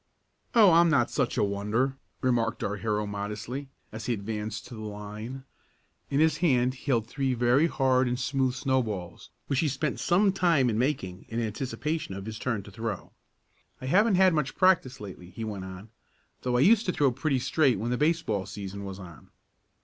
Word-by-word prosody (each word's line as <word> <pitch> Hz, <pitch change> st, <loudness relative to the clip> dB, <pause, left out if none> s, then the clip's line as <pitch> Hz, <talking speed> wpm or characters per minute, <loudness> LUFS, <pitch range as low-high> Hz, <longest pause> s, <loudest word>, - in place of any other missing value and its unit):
"Oh, 210 Hz, -5 st, +8 dB
I'm 170 Hz, +1 st, +6 dB
not 135 Hz, -7 st, +2 dB
such -, -, 0 dB
a -, -, +3 dB
wonder," 105 Hz, +7 st, 0 dB, 0.3 s
remarked 120 Hz, -3 st, +1 dB
our 105 Hz, +1 st, -2 dB
hero 105 Hz, 0 st, -1 dB
modestly, 105 Hz, +7 st, -5 dB, 0.2 s
as 110 Hz, 0 st, -7 dB
he 125 Hz, -, +2 dB
advanced 105 Hz, 0 st, -4 dB
to -, -, -11 dB
the 110 Hz, -, -7 dB
line. 105 Hz, +5 st, -7 dB, 0.7 s
In 140 Hz, -, +1 dB
his 160 Hz, 0 st, +3 dB
hand 130 Hz, -7 st, +2 dB
he 130 Hz, -, -15 dB
held 120 Hz, -6 st, +2 dB
three 130 Hz, +1 st, -1 dB
very 125 Hz, +6 st, +3 dB
hard 130 Hz, -4 st, +2 dB
and 125 Hz, 0 st, -1 dB
smooth 130 Hz, -1 st, 0 dB
snowballs, 120 Hz, -10 st, -2 dB, 0.2 s
which 135 Hz, -, 0 dB
he 160 Hz, -, +2 dB
spent 140 Hz, +1 st, -2 dB
some 195 Hz, +3 st, +3 dB
time 165 Hz, -10 st, +3 dB
in 110 Hz, -, -1 dB
making 95 Hz, -9 st, -2 dB
in 115 Hz, -, -2 dB
anticipation 130 Hz, +3 st, -3 dB
of 95 Hz, 0 st, -7 dB
his 110 Hz, 0 st, -6 dB
turn 115 Hz, -6 st, -2 dB
to 100 Hz, -, -12 dB
throw. 110 Hz, -1 st, -5 dB, 0.7 s
"I -, -, -7 dB
haven't 200 Hz, -, +4 dB
had 185 Hz, -1 st, +5 dB
much 150 Hz, -4 st, -1 dB
practice 170 Hz, -9 st, +3 dB
lately," 90 Hz, -3 st, -9 dB
he 105 Hz, +5 st, -7 dB
went 100 Hz, -4 st, -5 dB
on, 95 Hz, +3 st, -9 dB, 0.5 s
"though 125 Hz, -1 st, 0 dB
I -, -, +3 dB
used 215 Hz, +7 st, +5 dB
to -, -, +3 dB
throw 145 Hz, -6 st, +2 dB
pretty 135 Hz, +2 st, 0 dB
straight 130 Hz, -1 st, +2 dB
when 115 Hz, +5 st, -2 dB
the -, -, +2 dB
baseball 150 Hz, -, +1 dB
season 100 Hz, 0 st, -6 dB
was 95 Hz, -1 st, -6 dB
on." 85 Hz, -6 st, -12 dB
125 Hz, 190 wpm, -28 LUFS, 105-140 Hz, 0.7 s, Oh